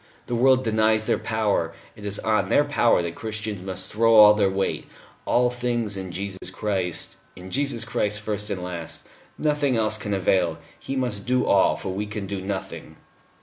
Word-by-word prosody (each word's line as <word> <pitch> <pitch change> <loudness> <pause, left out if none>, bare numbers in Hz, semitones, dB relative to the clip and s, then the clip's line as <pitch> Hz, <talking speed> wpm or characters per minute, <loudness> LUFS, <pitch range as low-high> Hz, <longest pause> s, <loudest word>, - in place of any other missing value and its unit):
The - - -5
world 130 +2 +4
denies 110 -1 +2
their - - +1
power: 105 -7 0 0.2
it 105 -1 -7
is 100 0 -1
on 110 -1 0
their 145 - +4
power 120 -10 +2
that 85 -1 -3
Christians 110 -1 -5
must 95 -1 -5
throw 115 +1 +4
all 105 -1 +9
their 105 -2 +2
weight. 95 0 -2 0.4
All 125 0 +3
things 120 -4 -2
in 95 -2 -5
Jesus 95 +1 -5
Christ 95 -5 -3 0.2
in 90 +1 -10
Jesus 140 -4 -1
Christ, 105 -3 -1
first 105 -1 -3
and 90 -2 -3
last. 85 -2 -6 0.3
Nothing 145 -4 +1
else 110 -1 +1
can 105 -1 -2
avail. 90 -3 +1 0.2
He 135 - -5
must 120 -6 -2
do 125 0 +2
all, 100 - +4
for - - -6
we 100 +3 -3
can 105 -1 -5
do 95 0 -4
nothing." 95 -1 -6
105 Hz, 185 wpm, -24 LUFS, 95-115 Hz, 0.4 s, all